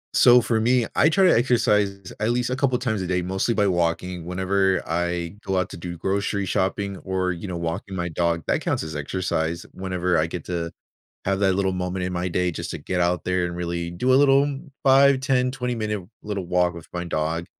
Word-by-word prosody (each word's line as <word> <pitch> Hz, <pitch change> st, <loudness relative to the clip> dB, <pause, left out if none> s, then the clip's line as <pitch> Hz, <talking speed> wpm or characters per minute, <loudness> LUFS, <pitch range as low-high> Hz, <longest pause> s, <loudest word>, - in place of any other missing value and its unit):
So 125 Hz, 0 st, +7 dB
for 115 Hz, 0 st, 0 dB
me, 120 Hz, +1 st, +3 dB
I 155 Hz, -, +5 dB
try 190 Hz, +4 st, +3 dB
to 180 Hz, -, +6 dB
exercise 105 Hz, -6 st, +1 dB
at 110 Hz, -, +1 dB
least 120 Hz, +1 st, 0 dB
a 130 Hz, -, +1 dB
couple 130 Hz, -2 st, +1 dB
times 115 Hz, -5 st, -1 dB
a 90 Hz, -, -3 dB
day, 90 Hz, 0 st, 0 dB
mostly 95 Hz, +5 st, 0 dB
by 105 Hz, -, +3 dB
walking. 90 Hz, -1 st, -1 dB
Whenever 95 Hz, +1 st, +1 dB
I 85 Hz, +1 st, -2 dB
go 95 Hz, -1 st, -1 dB
out 95 Hz, 0 st, 0 dB
to -, -, -7 dB
do 85 Hz, 0 st, -6 dB
grocery 100 Hz, +2 st, -1 dB
shopping 95 Hz, +1 st, -1 dB
or, 95 Hz, -1 st, -1 dB
you 85 Hz, +3 st, -6 dB
know, 90 Hz, -, -4 dB
walking 85 Hz, +3 st, -4 dB
my 85 Hz, -1 st, -2 dB
dog, 85 Hz, 0 st, 0 dB
that -, -, 0 dB
counts -, -, -1 dB
as 80 Hz, -1 st, -6 dB
exercise. 80 Hz, +2 st, -2 dB
Whenever 90 Hz, -2 st, 0 dB
I 80 Hz, -, +1 dB
get 85 Hz, 0 st, -6 dB
to 85 Hz, -2 st, -3 dB, 0.5 s
have 95 Hz, 0 st, +1 dB
that 95 Hz, -2 st, +3 dB
little 95 Hz, 0 st, +1 dB
moment 90 Hz, 0 st, -2 dB
in 90 Hz, -, -3 dB
my 90 Hz, +1 st, -1 dB
day 90 Hz, +1 st, 0 dB
just -, -, -5 dB
to -, -, -4 dB
get 90 Hz, -1 st, -2 dB
out 90 Hz, 0 st, +1 dB
there 90 Hz, -1 st, 0 dB
and 85 Hz, 0 st, -4 dB
really 85 Hz, -1 st, -3 dB
do 125 Hz, +10 st, +1 dB
a -, -, +7 dB
little 140 Hz, 0 st, +5 dB, 0.4 s
5, 135 Hz, 0 st, +6 dB
10, 130 Hz, -1 st, +2 dB
20 125 Hz, -1 st, -3 dB
minute 105 Hz, -3 st, -3 dB, 0.2 s
little 100 Hz, -3 st, -4 dB
walk 90 Hz, 0 st, +1 dB
with 85 Hz, -, -10 dB
my 90 Hz, 0 st, -3 dB
dog. 80 Hz, +1 st, -2 dB
95 Hz, 220 wpm, -24 LUFS, 85-110 Hz, 0.5 s, So